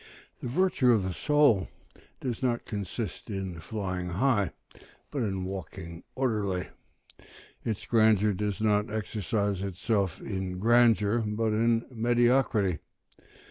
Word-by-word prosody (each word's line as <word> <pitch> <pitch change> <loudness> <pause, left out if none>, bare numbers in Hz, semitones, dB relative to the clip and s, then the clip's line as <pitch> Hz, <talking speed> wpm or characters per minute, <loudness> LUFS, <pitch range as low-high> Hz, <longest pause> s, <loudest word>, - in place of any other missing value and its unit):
] - - -30
The - - -3
virtue 135 -4 +3
of 105 -4 +2
the 95 -1 -2
soul 145 -6 +3 0.5
does 125 -3 -3
not 120 -2 0
consist 105 +1 -5
in 95 -4 -4
flying 90 -1 -4
high, 105 +1 +2 0.6
but 140 - -2
in 95 -4 -1
walking 90 -2 -7
orderly; 105 -8 -1 0.9
its 110 -4 -3
grandeur 110 -2 +4
does 105 +1 -2
not 105 -1 +2
exercise 105 -2 -1
itself 95 -1 -1
in 95 -3 -4
grandeur, 115 0 +4
but 110 0 0
in 115 +1 +2
mediocrity. 120 - +2
105 Hz, 120 wpm, -28 LUFS, 95-115 Hz, 0.9 s, grandeur